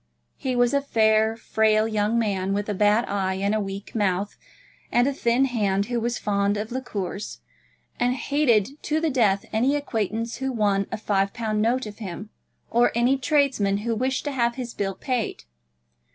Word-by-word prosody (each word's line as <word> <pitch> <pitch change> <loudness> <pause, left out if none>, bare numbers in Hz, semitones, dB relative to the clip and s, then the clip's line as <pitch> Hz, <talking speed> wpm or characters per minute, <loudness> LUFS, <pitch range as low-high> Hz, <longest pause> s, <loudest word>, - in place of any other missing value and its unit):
He 260 -2 -2
was 245 +1 +3
a 280 - +3
fair, 220 -3 +2
frail 220 -1 +2
young 215 +1 0
man, 195 -4 0
with 205 0 -2
a 210 - -1
bad 210 +4 +3
eye, 190 -1 -1
and 200 +2 0
a 215 - +1
weak 195 0 -6
mouth, 200 -2 0 0.6
and 245 +2 +3
a 280 - 0
thin 245 +1 +2
hand, 200 -6 0
who 240 - +1
was 235 0 -1
fond 200 0 0
of 215 +3 -4
liqueurs, 210 -6 -5 0.6
and 245 +1 +2
hated 275 -2 +1
to 310 +1 0
the 320 -1 0
death 210 -7 +2
any 250 +6 +2
acquaintance 230 -4 -2
who 265 +1 -2
won 205 -4 +1
a - - -2
five 200 -2 0
pound 215 -3 -1
note 240 +3 +1
of 210 0 -9
him, 210 0 -7 0.4
or 240 +1 +4
any 240 +3 +3
tradesman 260 -8 +1
who 235 - +1
wished 260 +4 -1
to 290 - -1
have 235 -3 0
his 245 -3 -5
bill 195 -1 -2
paid. 250 -4 -3
220 Hz, 180 wpm, -24 LUFS, 205-250 Hz, 0.6 s, or